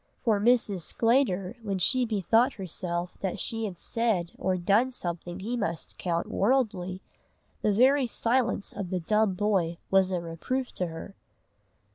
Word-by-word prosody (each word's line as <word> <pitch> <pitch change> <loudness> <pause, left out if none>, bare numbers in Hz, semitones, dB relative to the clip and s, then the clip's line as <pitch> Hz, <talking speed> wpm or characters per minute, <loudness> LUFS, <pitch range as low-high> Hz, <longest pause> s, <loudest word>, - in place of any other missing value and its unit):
For 215 -4 +3
Mrs. 220 -3 +3
Sclater, 225 - +1
when 200 -3 -2
she 250 +7 +2
bethought 225 +4 +2
herself 180 -2 -4
that 190 -2 -3
she 225 -1 -2
had 190 -4 -5
said 210 -6 -1
or 185 0 0
done 205 +8 +3
something 175 -6 -5
he 230 +5 -2
must 170 -8 -4
count 170 -2 -1
worldly, 200 -6 0 0.6
the 210 - +2
very 260 +5 +4
silence 230 -2 0
of 195 -3 -5
the 185 0 -1
dumb 210 +2 +2
boy 185 -4 +1
was 190 -1 +4
a 180 - 0
reproof 170 +11 -3
to 180 - -2
her. 165 +4 -8
200 Hz, 150 wpm, -28 LUFS, 180-230 Hz, 0.6 s, very